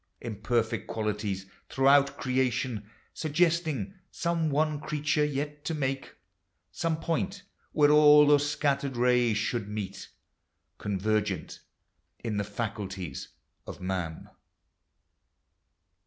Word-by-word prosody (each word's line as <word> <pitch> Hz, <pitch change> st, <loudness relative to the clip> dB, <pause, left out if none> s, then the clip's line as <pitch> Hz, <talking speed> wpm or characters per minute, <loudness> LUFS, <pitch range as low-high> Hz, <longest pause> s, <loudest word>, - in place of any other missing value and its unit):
Imperfect 115 Hz, 0 st, -1 dB
qualities 105 Hz, -3 st, -2 dB, 0.2 s
throughout 140 Hz, +1 st, +4 dB
creation. 125 Hz, -4 st, -1 dB, 0.2 s
Suggesting 160 Hz, -, 0 dB, 0.2 s
some 170 Hz, -2 st, -1 dB
one 150 Hz, +1 st, +1 dB
creature 150 Hz, 0 st, 0 dB
xet 145 Hz, +1 st, -4 dB
to 165 Hz, -, -1 dB
make. 135 Hz, -2 st, -3 dB, 0.6 s
Some 165 Hz, -2 st, -1 dB
point 190 Hz, +5 st, -2 dB, 0.3 s
where 150 Hz, -1 st, +4 dB
all 150 Hz, 0 st, +8 dB
those 145 Hz, 0 st, +4 dB
scattered 140 Hz, -3 st, 0 dB
rays 120 Hz, -2 st, +3 dB
should 110 Hz, 0 st, -1 dB
meet 100 Hz, -2 st, -5 dB, 0.7 s
Convergent 105 Hz, 0 st, -1 dB, 0.6 s
in 110 Hz, -3 st, -3 dB
the 100 Hz, -, +1 dB
faculties 100 Hz, -, -5 dB, 0.4 s
of -, -, -7 dB
man. 90 Hz, -3 st, -4 dB
130 Hz, 95 wpm, -29 LUFS, 105-150 Hz, 0.7 s, all